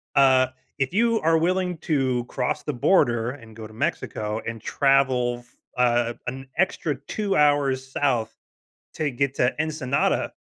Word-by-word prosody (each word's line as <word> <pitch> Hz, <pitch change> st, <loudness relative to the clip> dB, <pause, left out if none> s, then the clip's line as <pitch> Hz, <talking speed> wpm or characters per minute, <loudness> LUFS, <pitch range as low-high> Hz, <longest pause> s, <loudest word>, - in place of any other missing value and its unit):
uh, 130 Hz, -1 st, +5 dB, 0.3 s
if 135 Hz, +3 st, -1 dB
you 230 Hz, +2 st, +2 dB
are 165 Hz, +1 st, +3 dB
willing 180 Hz, +1 st, 0 dB
to 130 Hz, -6 st, 0 dB
cross 125 Hz, 0 st, -2 dB
the 150 Hz, -, -3 dB
border 120 Hz, -4 st, +2 dB
and 115 Hz, -5 st, -13 dB
go 110 Hz, -1 st, -8 dB
to 110 Hz, -, -16 dB
Mexico, 110 Hz, 0 st, -3 dB
and 115 Hz, -1 st, -5 dB
travel 130 Hz, -3 st, +2 dB
f 120 Hz, -1 st, -23 dB, 0.2 s
uh, 120 Hz, -1 st, +2 dB
an 130 Hz, +2 st, -5 dB
extra 170 Hz, -5 st, 0 dB
2 205 Hz, -2 st, -1 dB
hours 145 Hz, -3 st, +2 dB
South, 120 Hz, -6 st, 0 dB, 0.6 s
to 155 Hz, -2 st, -1 dB
get 140 Hz, +2 st, -1 dB
to 125 Hz, -2 st, +1 dB
Ensenada 150 Hz, -4 st, 0 dB
135 Hz, 150 wpm, -24 LUFS, 120-150 Hz, 0.6 s, uh